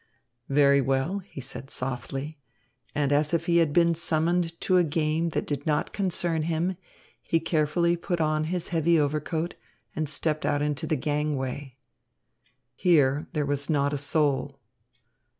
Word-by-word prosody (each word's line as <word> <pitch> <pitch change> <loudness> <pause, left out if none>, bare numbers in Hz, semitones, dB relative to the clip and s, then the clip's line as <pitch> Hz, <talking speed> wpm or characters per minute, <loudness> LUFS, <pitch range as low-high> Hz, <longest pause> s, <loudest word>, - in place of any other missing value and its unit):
"Very 140 0 +5
well," 135 +9 0
he 185 -6 -11
said 135 +1 -7
softly; 135 +4 -4 0.6
and, 145 -1 +1
as 150 +3 +2
if 165 0 -1
he 170 -1 +3
had 165 -3 +3
been 170 +1 +4
summoned 165 +1 0
to 185 - +3
a 180 - +5
game 160 +1 0
that - - -2
did 145 0 -4
not 150 -1 0
concern 175 -4 0
him, 170 +3 -1 0.5
he 165 - +1
carefully 165 +2 +1
put 175 0 -3
on 155 -1 +1
his 175 +1 -2
heavy 165 0 +3
overcoat, 155 +3 -1 0.4
and 155 -2 -2
stepped 155 +1 +1
out 145 0 +1
into 150 +2 -2
the 155 - +1
gangway. 140 -2 -2 1.0
Here 145 -4 +3
there 150 -2 0
was 140 +1 -2
not 145 -2 +1
a - - 0
soul. 140 -2 +1
155 Hz, 150 wpm, -26 LUFS, 145-165 Hz, 1.0 s, Very